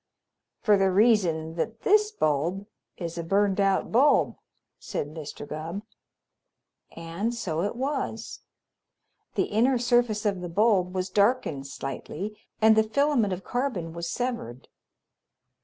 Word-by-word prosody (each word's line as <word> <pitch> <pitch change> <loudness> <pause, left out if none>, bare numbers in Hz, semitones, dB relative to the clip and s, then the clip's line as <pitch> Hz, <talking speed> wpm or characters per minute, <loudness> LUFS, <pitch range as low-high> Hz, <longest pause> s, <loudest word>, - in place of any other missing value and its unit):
"For 210 -3 +4
the 195 0 +3
reason 185 -6 +3
that 220 +6 -3
this 420 +1 +4
bulb 170 - 0 0.3
is 170 -1 -5
a - - -2
burned 195 +3 +1
out 195 -1 +2
bulb," 275 +6 +4 0.4
said 145 - -4
Mr. 150 -2 -8
Gubb. 165 +6 -5 1.1
And 170 +8 -3
so 165 -8 -2
it 205 +5 -2
was. 260 -4 -3 1.0
The - - +2
inner 245 +5 +2
surface 240 -3 +2
of 195 -3 0
the 175 - -5
bulb 190 -1 +2
was 185 0 -2
darkened 200 - +1
slightly, 160 +9 -6 0.2
and 220 0 +6
the 220 - +6
filament 235 -1 +1
of 185 +1 -4
carbon 225 -11 -2
was 170 0 -4
severed. 230 - -4
200 Hz, 130 wpm, -26 LUFS, 170-235 Hz, 1.1 s, and